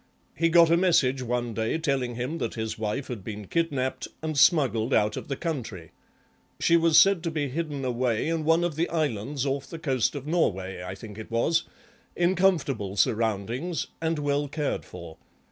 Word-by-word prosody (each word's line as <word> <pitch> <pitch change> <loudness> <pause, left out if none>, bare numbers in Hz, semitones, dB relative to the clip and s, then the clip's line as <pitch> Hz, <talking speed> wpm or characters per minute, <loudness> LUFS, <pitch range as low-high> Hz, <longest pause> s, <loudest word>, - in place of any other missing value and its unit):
He 165 +1 +1
got 165 0 +6
a 170 - +5
message 140 -8 +3
one 120 -1 -2
day 110 +7 -1
telling 135 -6 -1
him 130 +8 -3
that - - -3
his 110 -1 -3
wife 110 +5 -3
had 115 -6 -6
been 105 0 -6
kidnapped 130 - -1 0.2
and 155 -1 -2
smuggled 135 -6 +3
out 105 0 +2
of - - -6
the 140 - -2
country; 115 - -5 0.7
she 170 - +4
was 165 -1 +4
said 195 -3 +5
to 170 - -2
be 150 -3 -2
hidden 145 -1 -3
away, 125 -1 0
in 165 -1 -1
one 165 +2 +3
of 175 -3 -1
the 165 +3 0
islands 140 -4 -1
off 135 0 -2
the 165 - -7
coast 135 -5 0
of 140 -1 -6
Norway 95 - -1
I 90 +1 -6
think 105 +1 -10
it 110 - -8
was, 160 +9 +1 0.5
in 175 +1 +2
comfortable 145 - +1
surroundings 115 - 0 0.2
and 165 0 0
well 145 0 0
cared 145 0 -3
for. 80 - -10
140 Hz, 185 wpm, -26 LUFS, 115-165 Hz, 0.7 s, got